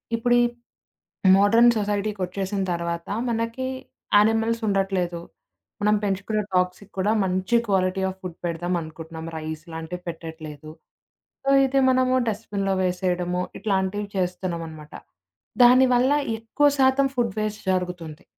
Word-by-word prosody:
ఇప్పుడు 240 +1 +1
ఈ - - +4 0.9
మోడర్న్ 230 +4 +6
సొసైటీకొచ్చేసిన 200 -1 -2
తర్వాత, 170 0 -3 0.2
మనకి 230 +2 -2 0.5
యానిమల్స్ 225 +2 +3
ఉండట్లేదు. 190 -3 0 0.6
మనం 210 +1 +3
పెంచుకునే 200 +2 -1
డాగ్స్‌కి 180 +2 0
కూడా 200 +3 +2
మంచి 185 +5 +1
క్వాలిటీ 190 -1 +1
ఆఫ్ 190 0 -7
ఫుడ్ 180 -3 -7
పెడదాం 175 +1 -2
అనుకుంటున్నాం, 160 +1 -8
రైస్ 155 0 -6
లాంటివి 165 +2 -6
పెట్టట్లేదు. 160 -2 -8 0.7
సో, 275 - +2 0.2
ఇది 270 +1 +1
మనము 255 0 +2
డస్ట్‌బిన్‌లో 200 -2 -2
వేసేయడము, 180 -1 -1 0.2
ఇట్లాంటివి 200 0 -1
చేస్తున్నామనమాట. 170 -4 -4 0.7
దానివల్ల 255 +1 +5 0.3
ఎక్కువ 225 +6 +1
శాతం 265 +1 +4
ఫుడ్ 240 -2 0
వేస్ట్ 215 0 -3
జరుగుతుంది. 175 -4 -4
190 Hz, 110 wpm, -24 LUFS, 175-220 Hz, 0.9 s, మోడర్న్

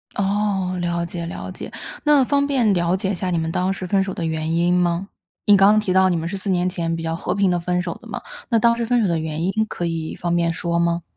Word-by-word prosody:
哦， 195 -2 0
了 170 0 -1
解 170 0 -5
了 170 - -6
解， - - -8 0.3
那 295 -2 +5
方 280 +2 +2
便 250 -7 +2
了 175 0 +1
解 190 0 -1
一 200 - -1
下 185 +1 -3
你 175 - 0
们 160 0 -1
当 185 +3 0
时 190 - -4
分 195 +1 +2
手 190 - -4
的 170 - -3
原 160 0 -2
因 175 +1 +2
吗？ 180 +1 +1 0.4
你 205 - +7
刚 195 +1 +6
刚 215 - +4
提 190 -4 -1
到 190 0 +5
你 175 - +1
们 165 0 -2
是 195 +3 -4
4 195 +1 -4
年 180 -1 +2
前 170 -2 -2
比 165 - -5
较 165 0 -2
和 175 - -2
平 200 -2 +2
地 175 - +1
分 180 +1 -1
手 175 -1 -4
的 - - -13
嘛， - - -5 0.3
那 230 - +3
当 235 +1 +4
时 235 0 -2
分 240 +1 +2
手 210 - +2
的 170 -2 0
原 160 +1 -3
因 190 - +1 0.2
可 175 - -4
以 165 -1 -3
方 175 0 -1
便 170 -1 +2
说 170 +1 -1
吗？ 170 0 +1
180 Hz, 295 characters per minute, -21 LUFS, 170-195 Hz, 0.4 s, 你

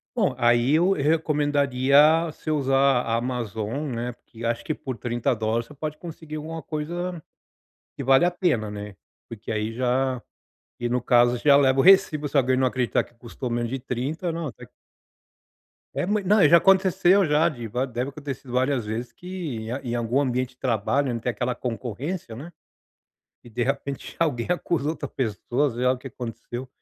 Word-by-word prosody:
Bom, 200 - +1
aí 120 +3 +3
eu 175 +4 +3
recomendaria 145 -1 +3
você 155 -1 -5
usar 135 -3 +3
a 115 -2 -1
Amazon, 120 +2 -3
né, 120 +1 -3
porque 115 -1 -11
acho 115 0 -1
que 155 - -2
por 130 -2 -6
$30 115 -1 -1
você 150 - -14
pode 150 +1 -5
conseguir 160 -2 -9
alguma 160 +1 -5
coisa 175 +3 -4 0.8
que 140 - -5
vale 135 +4 +5
a 175 - +2
pena, 160 - 0
né, 105 -1 -8 0.3
porque 110 -2 -9
aí 110 0 -1
já 130 +1 0 0.6
e 120 - -2
no 125 +1 0
caso 120 0 +4
já 140 +2 +5
leva 135 -1 +4
o - - +7
recibo, 185 -5 +5
se 140 - -11
alguém 130 -2 +3
não 130 0 +3
acreditar 125 -1 0
que - - -23
custou 120 +2 -7
menos 120 0 -1
de 135 +2 -3
30, 135 +8 -3
não, 165 -1 -3
tá - - -14 1.3
É 180 - -1
mui 210 0 0
não, 195 -4 +5
já 170 - +8
aconteceu 190 +1 +4
já, 155 +1 +3
de 120 -8 -5
va 125 +5 -1
deve 125 +2 -4
ter 145 - -30
acontecido 135 -3 -7
várias 130 0 +1
vezes 115 +3 -4
que 180 -8 -6
em 120 +3 -5
em - - -1
algum 120 +3 0
ambiente 130 -2 0
de - - -49
trabalho, 130 +3 0
onde 115 - -3
tem 125 - -1
aquela 120 +2 -1
concorrência, 125 - -5
né, 150 +9 -9 0.9
e 120 - -14
de 120 +2 -2
repente 135 +1 -3
alguém 140 -8 0
acusa 170 -4 0
outra 155 -3 -5
pessoa, 125 +4 -1
sei 120 +1 -3
lá 130 - +5
o - - -3
que 135 - -8
aconteceu, 120 +1 -7
130 Hz, 185 wpm, -24 LUFS, 120-155 Hz, 1.3 s, já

